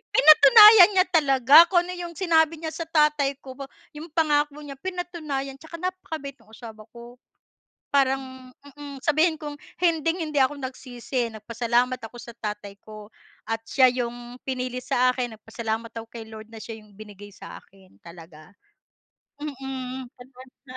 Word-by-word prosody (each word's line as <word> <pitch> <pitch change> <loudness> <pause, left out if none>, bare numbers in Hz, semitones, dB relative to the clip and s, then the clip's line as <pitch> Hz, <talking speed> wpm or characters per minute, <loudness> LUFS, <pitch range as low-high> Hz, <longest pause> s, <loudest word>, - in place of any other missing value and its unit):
Pinatunayan 420 - +8
niya 370 0 +4
talaga 275 -4 +3
kung 350 -1 +2
ano 360 - -7
yung 350 -1 -7
sinabi 325 -2 +2
niya 320 0 -6
sa 330 0 -7
tatay 300 -3 +1
ko 265 - -10
ba, 275 - -7 0.2
'yong 305 +2 -10
pangako 295 -3 +1
niya, 275 -2 -10
pinatunayan, 310 -7 -5
tsaka 320 +3 -11
napakabait 325 -6 -6
no'ng 220 - -18
asawa 220 -2 -12
ko. 240 +1 -13 0.7
Parang 260 -2 -1 0.2
mm 285 0 -11
sabihin 315 +3 +1
kong 300 -1 -7 0.2
hinding-hindi 325 -3 0
ako 265 +2 +1
nagsisi, 255 -2 -5
nagpasalamat 235 +3 -2
ako 225 +2 -10
sa 235 0 -11
tatay 210 -3 -7
ko 215 0 -13 0.3
at 225 0 -3
siya 255 -2 +4
'yong 245 0 -6
pinili 255 -1 -4
sa 250 +1 +1
akin. 245 -3 -5
Nagpasalamat 225 +1 -6
ako 230 0 -9
kay 230 -1 -10
Lord 220 0 -12
na 225 - -12
siya 220 0 -9
'yong 210 -2 -21
binigay 205 -1 -12
sa 200 - -12
akin, 190 -1 -24
talaga. 165 -2 -14 0.9
Mm, 265 -3 -7
advance 255 +1 -16
na. 255 -1 -11
260 Hz, 155 wpm, -24 LUFS, 230-305 Hz, 0.9 s, Pinatunayan